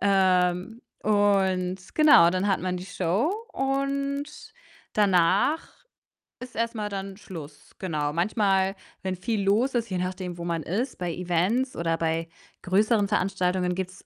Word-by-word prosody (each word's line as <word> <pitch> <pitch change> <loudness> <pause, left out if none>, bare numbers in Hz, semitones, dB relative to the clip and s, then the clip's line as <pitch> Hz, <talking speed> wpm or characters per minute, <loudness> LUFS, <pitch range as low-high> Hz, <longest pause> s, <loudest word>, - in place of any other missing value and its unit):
Ähm, 185 +1 +2 0.2
und 195 -3 +2 0.2
genau, 290 - +7
dann 185 +3 0
hat 195 - +1
man 180 -1 -2
die 180 - -8
Show 200 - 0 0.2
und 275 +1 -1 0.7
danach 200 - +3 0.7
ist 250 0 -10
erst 230 +1 -1
mal 210 -1 -3
dann 195 -1 -5
Schluss. 160 -7 -11
Genau. 150 -5 -2
Manchmal, 195 +1 +1 0.3
wenn 190 -1 -2
viel 205 +2 -2
los 225 +7 +2
ist, 235 -2 0
je 185 - -1
nachdem, 180 -1 -4
wo - - -4
man 165 -2 -2
ist 230 - -2
bei 175 -2 -3
Events 180 +10 0
oder 165 -1 0
bei 165 0 -1 0.4
größeren 205 +3 +2
Veranstaltungen 185 -2 0
gibt's 185 0 -6
190 Hz, 140 wpm, -26 LUFS, 180-215 Hz, 0.7 s, genau